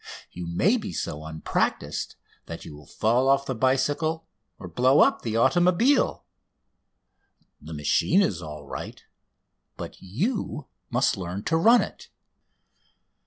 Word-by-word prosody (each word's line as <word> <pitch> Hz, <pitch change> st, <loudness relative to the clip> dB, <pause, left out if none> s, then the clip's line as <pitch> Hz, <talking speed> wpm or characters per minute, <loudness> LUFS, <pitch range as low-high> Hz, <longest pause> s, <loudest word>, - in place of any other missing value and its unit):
You 85 Hz, -1 st, -7 dB
may 175 Hz, -, +2 dB
be 215 Hz, -3 st, -6 dB
so 75 Hz, +1 st, -4 dB
unpractised 80 Hz, 0 st, -2 dB, 0.3 s
that -, -, -8 dB
you 75 Hz, -, -9 dB
will 75 Hz, -1 st, -15 dB
fall 120 Hz, +4 st, +1 dB
off 135 Hz, 0 st, +3 dB
the 130 Hz, -, -2 dB
bicycle 145 Hz, +6 st, 0 dB, 0.3 s
or 90 Hz, -, -9 dB
blow 125 Hz, -, +4 dB
up -, -, +3 dB
the 115 Hz, -1 st, -2 dB
automobile. 180 Hz, -, +3 dB, 1.4 s
The 80 Hz, +2 st, -8 dB
machine 75 Hz, -, +2 dB
is 90 Hz, -, -1 dB
all 75 Hz, -3 st, -8 dB
right, -, -, -8 dB, 0.7 s
but -, -, -8 dB
you 155 Hz, -, -3 dB, 0.2 s
must -, -, +1 dB
learn 95 Hz, +2 st, -5 dB
to 160 Hz, -, 0 dB
run 230 Hz, +9 st, +5 dB
it. -, -, -10 dB
130 Hz, 130 wpm, -25 LUFS, -, 1.4 s, run